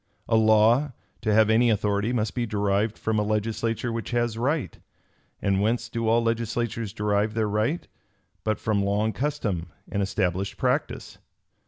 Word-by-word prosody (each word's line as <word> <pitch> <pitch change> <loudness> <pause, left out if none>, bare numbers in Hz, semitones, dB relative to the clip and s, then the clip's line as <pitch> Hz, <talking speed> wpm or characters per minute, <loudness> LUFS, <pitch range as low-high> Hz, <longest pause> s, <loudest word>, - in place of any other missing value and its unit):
A 115 - +2
law, 110 +5 +4 0.3
to 110 - 0
have 110 +1 +5
any 120 +2 +4
authority 105 +1 +1
must 110 -3 -1
be 120 -2 -1
derived 105 +1 0
from 110 -1 0
a - - +2
legislature 110 +2 -1
which 115 -1 -4
has 120 -2 0
right. 135 +5 -1 0.6
And 100 -1 +2
whence 115 +3 0
do 115 -1 -2
all 115 +1 +3
legislatures 115 -1 -1
derive 105 0 0
their 110 -2 +1
right, 110 +11 -1 0.6
but 110 -1 0
from 105 -2 0
long 105 +2 0
custom 105 - -2 0.2
and 100 - 0
established 95 -1 -1
practice? - - -2
110 Hz, 155 wpm, -25 LUFS, 105-115 Hz, 0.6 s, have